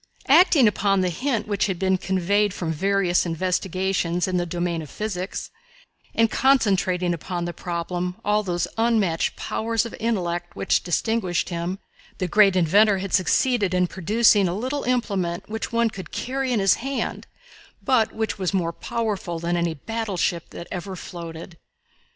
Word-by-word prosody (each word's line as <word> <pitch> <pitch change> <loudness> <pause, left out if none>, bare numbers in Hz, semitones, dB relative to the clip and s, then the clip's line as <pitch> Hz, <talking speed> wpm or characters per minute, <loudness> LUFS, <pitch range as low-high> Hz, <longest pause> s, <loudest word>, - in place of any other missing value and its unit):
Acting 300 -4 +6
upon 195 -1 +2
the 185 - +1
hint 230 - -1
which 205 -1 0
had 190 -3 -2
been 190 0 +1
conveyed 195 +2 +1
from 160 -2 -2
various 195 +1 +2
investigations 180 0 -1
in 185 -1 0
the 175 0 -1
domain 175 -1 -2
of 150 - -9
physics, 195 -3 -4 0.6
and 225 -1 +3
concentrating 190 -9 +2
upon 170 +1 -4
the 175 - -4
problem 175 +1 -3
all 210 +1 +3
those 175 -4 -1
unmatched 215 -8 +1
powers 225 0 -1
of 230 - -7
intellect 175 -6 -2
which - - +1
distinguished 185 0 0
him, 175 +2 -3 0.4
the 185 - -1
great 195 +1 +5
inventor 195 +4 +4
had 190 0 -5
succeeded 200 +1 +2
in 180 0 +3
producing 205 +3 +3
a 175 +2 -2
little 260 +6 -2
implement 200 -9 -1
which 220 +2 -4
one 230 -1 +2
could 190 -3 -8
carry 265 0 -2
in 235 - +2
his 195 -1 +5
hand, 270 +1 -3 0.5
but 225 -4 +2
which 220 -2 -3
was 190 +1 -1
more 170 -3 0
powerful 205 -5 -3
than 170 +1 -1
any 170 -2 0
battleship 195 - -2
that 170 - -9
ever 185 +1 -5
floated. 170 -1 -9
190 Hz, 155 wpm, -23 LUFS, 175-220 Hz, 0.6 s, Acting